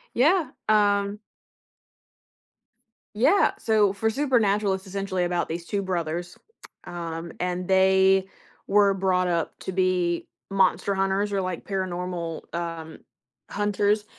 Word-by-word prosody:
Yeah. 315 +7 +3 0.2
Um 205 -1 +2 2.0
Yeah, 265 - +4
so 215 -3 +2
for 220 +3 0
Supernatural, 215 -6 +1
it's 190 +1 -5
essentially 195 -1 -2
about 175 0 -1
these 170 +1 -4
2 200 +2 -2
brothers, 175 -1 -3 0.5
um, 170 -1 -6
and 180 0 -2
they 190 0 +4 0.4
were 200 -1 +4
brought 185 -1 +1
up 170 -2 -1
to - - -4
be 180 -2 0 0.2
monster 195 +1 +2
hunters 195 +1 0
or 195 - +1
like 185 -2 -4
paranormal, 180 -4 -4
um, 165 -2 -5 0.5
hunters 205 +1 0
190 Hz, 115 wpm, -25 LUFS, 175-205 Hz, 2.0 s, Yeah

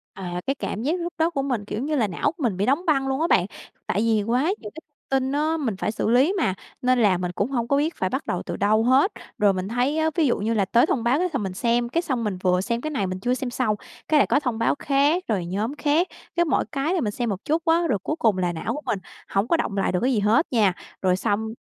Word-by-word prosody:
À, 180 -2 -5
cái 275 - +1
cảm 220 - -4
giác 320 +7 0
lúc 345 0 -4
đó 325 +1 +2
của 290 -5 -2
mình, 250 -7 -2
kiểu 210 +2 -4
như 305 +2 -1
là, 230 -7 +2
não 175 - -1
của 330 -2 -8
mình 210 -7 0
bị 200 - +1
đóng 285 +9 +1
băng 275 -4 +2
luôn 270 +3 -1
á 330 - +2
bạn. 180 - +3 0.4
Tại 205 - 0
vì 220 -2 +2
quá 240 +5 +1 0.2
nhiều 210 - -8
cái 320 - -9 0.3
tin 265 0 +1
á, 305 +3 +1
mình 250 -10 -2
phải 210 - -1
xử 215 - -1
lý 260 +10 +4
mà, 250 - +1 0.3
nên 255 0 +3
là 200 -5 +4
mình 180 0 -3
cũng 200 +8 -2
hông 235 -3 -1
có 280 +3 +2
biết 310 +3 0
phải 185 - -1
bắt 265 +7 -3
đầu 180 - -2
từ - - -4
đâu 215 +2 +3
hết. 265 - +4 0.3
Rồi 205 -1 +4
mình 185 0 -3
thấy 245 +7 0
á, 315 0 +2
ví 320 -5 +3
dụ - - +1
như 220 +3 -1
là 205 -3 +2
tới 235 +8 +4
thông 255 -7 -1
báo 245 +5 +2
cái 365 +1 +1
th 320 - -7
mình 195 -6 -3
xem, 235 +4 0
cái 335 +7 0
xong 260 -9 -2
mình 205 -4 -2
vừa 180 -1 +3
xem 235 +4 -2
cái 310 - -3
này 220 -11 -1
mình 185 0 -4
chưa 245 +6 0
xem 260 -1 -3
xong, 240 -3 0 0.3
cái 310 - +3
lại - - +4
có - - +3
thông 250 -6 -2
báo 230 - +2
khác, 290 +6 +2
rồi 195 -6 -1
nhóm 210 +10 -2
khác. 300 +4 +2 0.3
Cái 345 0 +3
mỗi 315 - +1
cái 285 +5 -1
là 365 - +1
mình 210 - -1
xem 240 +2 -2
một 195 0 -4
chút 315 +3 +1
á, 335 +1 +3
rồi 210 -6 +1
cuối 305 - -1
cùng 215 -5 +3
là 180 -1 0
não 170 +8 -3
của 295 - -5
mình 200 - -1 0.3
hổng 195 +3 0
có 335 - +3
đọng 200 -9 -2
lại 195 - +1
được 180 - 0
cái 260 +1 +2
gì 215 - +2
hết 220 +11 +3
nha. 210 -7 +3 0.3
Rồi 185 -1 +3
xong 220 +2 -1
240 Hz, 295 wpm, -24 LUFS, 205-290 Hz, 0.4 s, lý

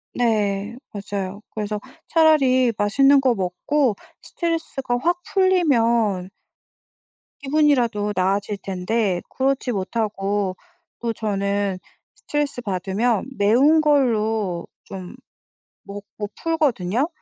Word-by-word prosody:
네. 210 -2 0 0.2
맞아요. 200 -1 -5
그래서 210 -1 -3 0.3
차라리 265 -7 +4
맛있는 275 +7 +4
거 255 -3 +2
먹고 210 +7 0 0.3
스트레스가 325 -7 -2
확 345 +7 0
풀리면 235 - +2 1.1
기분이라도 265 -8 +1
나아질 200 +2 0
텐데 195 0 -1
그렇지 270 -1 0
못하고 200 -1 -1 0.4
또 235 -1 -2
저는 200 -2 -1 0.4
스트레스 295 -4 -3
받으면 205 +4 -1
매운 255 +10 +4
걸로 220 - +1 0.2
좀 185 -2 -9 0.7
먹고 205 +1 -8
풀거든요. 275 - 0
220 Hz, 215 characters per minute, -22 LUFS, 200-270 Hz, 1.1 s, 차라리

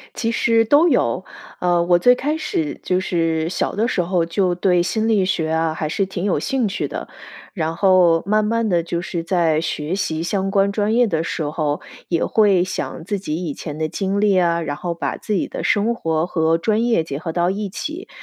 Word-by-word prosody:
其 230 0 -1
实 230 0 +3
都 290 +9 +4
有， - - +1 0.4
呃， 175 -1 +2
我 175 0 +3
最 245 +6 +5
开 295 +5 -1
始 155 - -3
就 185 0 0
是 165 -2 0
小 185 - -2
的 220 +3 +1
时 185 - 0
候 175 -1 0
就 180 +1 0
对 180 -1 +2
心 220 +5 -1
理 200 -4 +3
学 160 -4 -1
啊， 160 0 0
还 155 -1 -3
是 195 +4 0
挺 185 -1 -5
有 185 -7 +1
兴 255 - 0
趣 - - -2
的。 - - -6 0.5
然 165 -4 -2
后 175 -2 +4
慢 215 +1 +2
慢 230 +1 0
地 170 -3 +1
就 170 0 -3
是 170 -1 -4
在 165 -3 +1
学 160 +1 -3
习 165 -5 -2
相 195 +2 -1
关 200 0 +2
专 210 +1 0
业 240 0 +4
的 160 -3 -1
时 165 -1 -3
候， 150 0 -2 0.3
也 170 -2 +1
会 200 -5 +3
想 170 -2 -5
自 205 0 -2
己 155 -5 -4
以 145 - -3
前 150 0 -7
的 155 0 -1
经 195 +4 -2
历 205 -2 +3
啊， 170 -1 +2
然 145 -2 -3
后 175 +2 -3
把 165 - -3
自 215 - -4
己 190 - 0
的 - - -6
生 225 +3 +1
活 160 -4 -1
和 165 -1 +1
专 215 +6 +1
业 235 -8 +2
结 140 -3 -5
合 165 +1 -4
到 175 +1 +1
一 200 +1 -3
起。 315 - -6
180 Hz, 235 characters per minute, -20 LUFS, 165-205 Hz, 0.5 s, 最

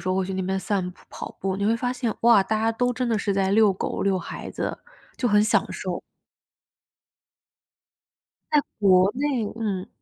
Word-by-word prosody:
时 - - -5
候 185 - +1
会 190 -1 0
去 190 - -4
那 190 - -1
边 190 +1 -1
散 190 -2 -1
步、 180 - -19
跑 - - -7
步。 190 0 -1
你 200 - -2
会 225 +2 +3
发 245 +1 -1
现， 245 -3 -2
哇， 230 -4 +6
大 215 +3 -1
家 225 +1 +2
都 245 +2 0
真 250 0 -2
的 230 - +1
是 200 0 0
在 195 0 +1
遛 215 -1 +5
狗、 185 - -3
遛 195 -1 +2
孩 170 - -7
子， - - -3 0.4
就 250 - 0
很 210 -1 +5
享 215 - +3
受。 - - -4 2.5
在 300 - +5 0.2
国 190 -2 +5
内 270 -3 0
嗯。 205 -3 -3
210 Hz, 210 characters per minute, -24 LUFS, 190-230 Hz, 2.5 s, 哇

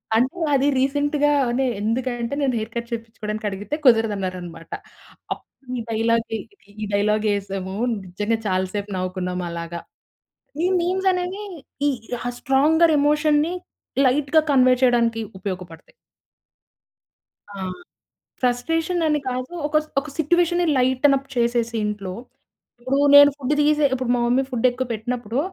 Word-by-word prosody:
అంటే 255 +10 +1 0.2
అది 275 0 +3
రీసెంట్‌గానే 280 -2 +1
ఎందుకంటే, 240 +2 -2
నేను 265 -3 +1
హెయిర్ 220 +1 -6
కట్ 235 0 -4
చేపిచ్చుకోవడానికి 220 -2 -4
అడిగితే 205 +8 -4
కుదరదన్నారన్నమాట. 190 -8 +1 0.6
అప్పుడు 255 -2 -16
ఈ - - -3
డైలాగ్‌ది 225 0 0 0.2
ఇది 230 - -29 0.2
ఈ - - -1
డైలాగ్ 210 +1 +1
యేసాము. 195 -1 -4 0.3
నిజంగా 205 +5 -1
చాలా 185 -1 +1
సేపు 205 0 -4
నవ్వుకున్నాం 180 0 -3
అలాగా. 170 0 -5 0.8
ఈ - - +4
మీమ్స్ 375 +2 0
అనేవి, 365 +3 -3 0.5
ఈ - - +3 0.5
స్ట్రాంగర్ 310 +4 +4
ఎమోషన్‌ని 300 +3 +2 0.5
లైట్‌గా 290 +4 +3
కన్వే 255 -2 +5
చేయడానికి 235 -2 +3 0.2
ఉపయోగపడతాయి. 180 -4 -7 1.6
ఆ! 200 - -8 0.8
ఫ్రస్ట్రేషన్ 325 +8 0
అ‌ని 300 -1 +1
కాదు. 255 +3 -4
ఒక 300 +1 0
స్ - - -21
ఒక 300 - -10
సిట్యుయేషన్‌ని 345 +2 +2
లైటెనప్ 265 +2 +3
చేసేసి 235 -1 +1
ఇంట్లో. 200 -3 -4 0.7
ఇప్పుడు 260 +3 0 0.2
నేను 285 0 +9
ఫుడ్ 280 -1 -2
తీసే 300 0 +4
ఇప్పుడు 255 -2 -2
మా 245 - 0
మమ్మీ 250 +3 +3
ఫుడ్ 250 -1 +1
ఎక్కువ 255 +1 -3
పెట్టినప్పుడు 235 +1 -3
245 Hz, 125 wpm, -22 LUFS, 210-290 Hz, 1.6 s, నేను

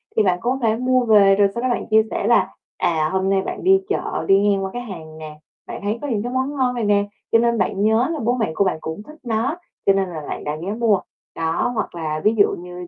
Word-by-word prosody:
thì 220 - +4
bạn 180 -2 +1
có 255 +3 -1
thể 220 -2 +2
mua 255 0 +1
về 200 -3 +6
rồi 200 0 +4
sau 235 - -2
đó 255 - +1
bạn 240 - -1
chia 220 0 +6
sẻ - - -1
là, - - +3 0.3
à, 155 -2 +1
hôm 190 0 0
nay 195 -1 +2
bạn - - -6
đi 385 +1 +5
chợ 410 - -2
đi 195 0 +5
ngang 195 -1 +1
qua 190 - -4
cái 245 - -4
hàng 165 -9 -9
nè, 155 -1 -9 0.3
bạn - - -7
thấy 210 +3 -2
có 290 - -4
những 220 -6 -1
cái 245 +1 -4
món 260 +3 -1
ngon 255 -2 0
này 240 - -2
nè, 205 -1 +2 0.3
cho 230 - +5
nên 235 0 +2
bạn 195 0 -1
nhớ 220 +4 +3
là 320 - -3
bố 240 -1 +1
mẹ 225 -9 -1
của 200 - +3
bạn 185 -4 0
cũng 160 +6 -6
thích 305 +7 -14
nó 240 +6 -1 0.3
cho 195 - +5
nên 195 -2 0
là 160 -3 -6
bạn - - -5
đã 150 0 -3
ghé 195 +4 -3
mua. 220 -3 +2 0.4
Đó, 165 +8 -1
hoặc 215 - -3
là 155 -2 -3
ví 215 +2 +3
dụ 200 - +4
như 180 0 -9
210 Hz, 275 wpm, -21 LUFS, 185-240 Hz, 0.4 s, về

